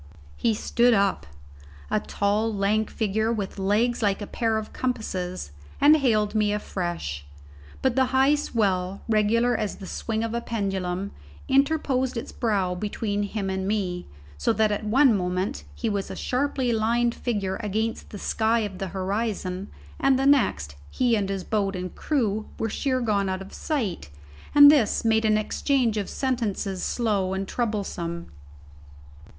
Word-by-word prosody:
He 225 -2 +1
stood 240 +2 +3
up 200 - +1 0.6
a 215 - +3
tall, 210 +2 0
lank 210 +1 +1
figure, 220 +1 0
with 205 -3 -3
legs 215 +6 +1
like 200 -2 +1
a 205 - -4
pair 225 +1 0
of 215 0 -5
compasses 185 - -3 0.3
and 295 +2 +7
hailed 215 -7 +2
me 210 -1 +2
afresh, 175 - -3 0.6
but 260 -2 +2
the 265 0 +4
high 265 +2 +3
swell, 195 -9 0
regular 230 +3 +3
as 210 -2 -2
the 195 - -10
swing 220 +3 -3
of 230 0 -3
a 235 - -1
pendulum, 195 -4 -2 0.4
interposed 270 -2 +1
its 230 - -5
brow 200 -6 0
between 205 +2 -2
him 205 -1 -3
and 190 0 -2
me, 185 -4 -2 0.3
so 75 - +2
that 215 -1 +2
at 205 - -2
one 245 +3 +4
moment 180 +1 -2
he 230 - -3
was 200 -2 -1
a - - -5
sharply 260 -2 0
lined 235 +2 +2
figure 205 -7 -2
against 220 +2 -2
the 205 - -8
sky 225 +3 +1
of 200 -3 -5
the 195 - -2
horizon, 195 0 -2 0.3
and 270 -1 +4
the 270 - 0
next 150 - +3 0.2
he 245 -2 +2
and 200 -3 -1
his 195 -1 -2
boat 200 -2 -1
and 180 0 -5
crew 220 -8 -1
were 225 - -1
sheer 260 0 0
gone 205 -4 +1
out 185 0 -2
of 195 - -13
sight, 225 - -3 0.5
and 290 0 +10
this 240 -7 +2
made 220 0 +3
an 215 -1 +4
exchange 240 +2 +1
of 205 -2 -2
sentences 215 -7 -2
slow 200 -5 0
and 195 0 -3
troublesome. 190 -8 -3
215 Hz, 160 wpm, -25 LUFS, 195-235 Hz, 0.6 s, and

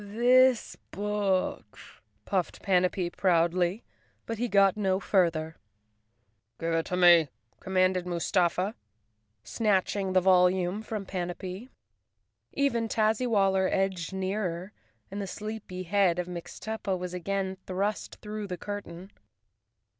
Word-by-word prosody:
"This 245 +4 +3
book," 205 -2 -1 0.5
puffed 185 -3 -2
Panapee 180 -1 +1
proudly—but 180 +5 -1
he 245 - 0
got 200 -2 +4
no 190 -3 0
further. 165 -5 +1 0.5
" 110 -1 -47
Give 165 0 -1
it 165 0 0
to 180 - -2
me," 175 -3 +7 0.3
commanded 185 -1 +1
Mustafa, 180 +3 0 0.7
snatching 195 - 0
the 185 - +5
volume 180 +1 +3
from 215 -2 -5
Panapee. 185 +4 -5 0.8
Even 240 -5 0
Tazzywaller 215 -4 +2
edged 190 -3 -1
nearer, 190 -1 -3 0.4
and 200 +1 -4
the 195 - -4
sleepy 210 -3 -6
head 185 -1 +2
of 180 - -1
Mixtuppa 190 +3 -4
was 180 0 -6
again 190 +1 -2
thrust 200 +3 -2
through 210 -1 -5
the 180 -2 -5
curtain. 195 -2 -7
190 Hz, 110 wpm, -28 LUFS, 180-205 Hz, 0.8 s, me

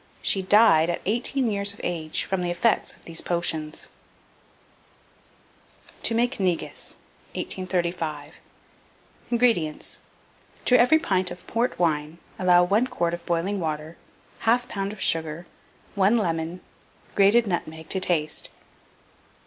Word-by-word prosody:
She 195 - +2
died 185 -5 +5
at 175 - -1
eighteen 240 +5 0
years 200 0 -1
of - - -12
age, 160 -3 -1
from 190 -1 -2
the 175 - -1
effects 195 +6 +1
of - - -19
these 165 -1 -2
potions." 160 -3 -1 2.1
TO 230 - +1
MAKE 240 +2 0
NEGUS. 180 -3 -2 0.4
1835. 170 -5 -3 0.9
INGREDIENTS. 230 -11 +1 0.7
To 250 - +6
every 250 +6 +6
pint 185 -10 0
of 175 0 -10
port 235 +3 -1
wine 155 -2 0 0.2
allow 180 -1 +5
1 205 +7 +2
quart 175 -10 -1
of 175 0 -5
boiling 175 +4 0
water, 155 -1 -4 0.5
1/4 240 +2 +2
lb. 195 0 -3
of 215 - -12
sugar, 160 0 -1 0.5
1 200 +3 +3
lemon, 170 -4 -1 0.5
grated 205 +4 +5
nutmeg 160 -4 -4
to 190 - +1
taste. 160 -5 +1
180 Hz, 125 wpm, -25 LUFS, 165-210 Hz, 2.1 s, To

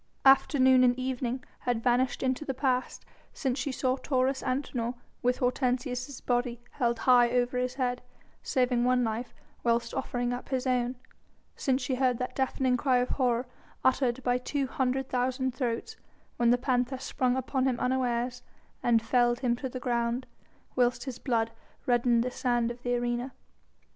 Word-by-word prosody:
Afternoon 260 -1 +6
and 245 0 +4
evening 255 -1 -2 0.2
had 240 -2 -1
vanished 250 +1 +1
into 260 +2 0
the 270 -3 -3
past 255 -1 -1 0.3
since 265 -2 -2
she 275 +2 -2
saw 260 0 0
Taurus 265 0 0
Antinor, 250 -2 -2 0.3
with 250 0 +1
Hortensius' 250 0 -1
body 245 -1 0
held 235 -4 0
high 245 0 +5
over 245 +1 +1
his 250 0 -2
head, 250 -2 -1 0.4
saving 250 -2 +1
one 250 0 +3
life 225 +2 -2 0.3
whilst 235 0 +1
offering 245 -2 -2
up 245 - -6
his 260 -1 -1
own, 250 -1 +1 0.6
since 260 -1 0
she 260 - -1
heard 255 -1 +2
that 250 - -4
deafening 260 -1 +1
cry 255 0 +2
of 245 0 0
horror 250 -2 +1 0.4
uttered 260 -1 +2
by 245 0 +2
two 275 +2 -1
hundred 260 0 -1
thousand 255 +1 0
throats 255 - -3 0.4
when 235 -1 +3
the 245 - +5
panther 250 0 0
sprung 255 -1 0
upon 260 0 0
him 250 -2 0
unawares 250 -1 0 0.4
and 230 -2 +3
felled 240 +1 +2
him 240 -2 +2
to 260 +1 -4
the 255 - -6
ground, 240 0 -1 0.5
whilst 245 -1 +2
his 260 -3 -6
blood 230 -3 0 0.3
reddened 240 -1 +3
the 250 - -2
sand 240 -2 0
of 240 0 -10
the 245 0 0
arena. 240 +1 -2
250 Hz, 165 wpm, -29 LUFS, 240-260 Hz, 0.6 s, Afternoon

